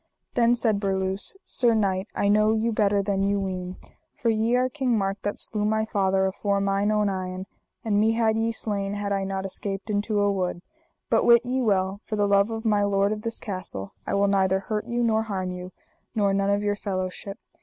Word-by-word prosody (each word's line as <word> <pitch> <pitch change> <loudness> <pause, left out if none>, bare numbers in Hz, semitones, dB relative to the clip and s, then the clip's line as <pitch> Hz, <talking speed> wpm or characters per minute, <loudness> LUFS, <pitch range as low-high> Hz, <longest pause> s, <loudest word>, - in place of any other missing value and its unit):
Then 240 0 +4
said 225 -4 +2
Berluse: 190 - -1
Sir 240 -3 +2
knight, 195 -2 0
I 200 - +1
know 215 +1 +4
you 225 +1 0
better 205 -2 +2
than 195 -1 0
you 200 +1 +1
ween, 185 -1 -4 0.4
for 230 - +2
ye 225 +2 +1
are 250 +1 +3
King 255 -3 0
Mark 195 0 -2
that 205 - -3
slew 210 -2 0
my 220 +1 +1
father 195 -3 +1
afore 200 +1 0
mine 200 +1 +1
own 210 -1 +2
eyen; 185 -1 -3 0.4
and 205 -2 +2
me 220 +1 +3
had 225 -1 +2
ye 225 +1 0
slain 205 -3 -2
had 205 0 -3
I 195 -1 0
not 195 0 -3
escaped 195 +2 -4
into 205 +1 0
a 205 0 +3
wood; 180 -2 -2 0.5
but - - +4
wit 235 0 +6
ye 255 +1 0
well, 195 -3 0
for 215 - -4
the 205 -1 +2
love 200 +1 +3
of 225 0 -5
my 210 -2 +3
lord 200 0 +2
of 215 0 -3
this 230 0 -2
castle 185 - -6
I - - 0
will 200 0 +3
neither 190 -1 +2
hurt 210 +1 -3
you 240 0 -1
nor 220 -1 +2
harm 190 -4 -3
you, 180 0 -7 0.4
nor 200 -2 +2
none 195 0 +1
of 200 +1 +1
your 205 0 +1
fellowship. 195 0 -4
205 Hz, 215 wpm, -25 LUFS, 195-220 Hz, 0.5 s, wit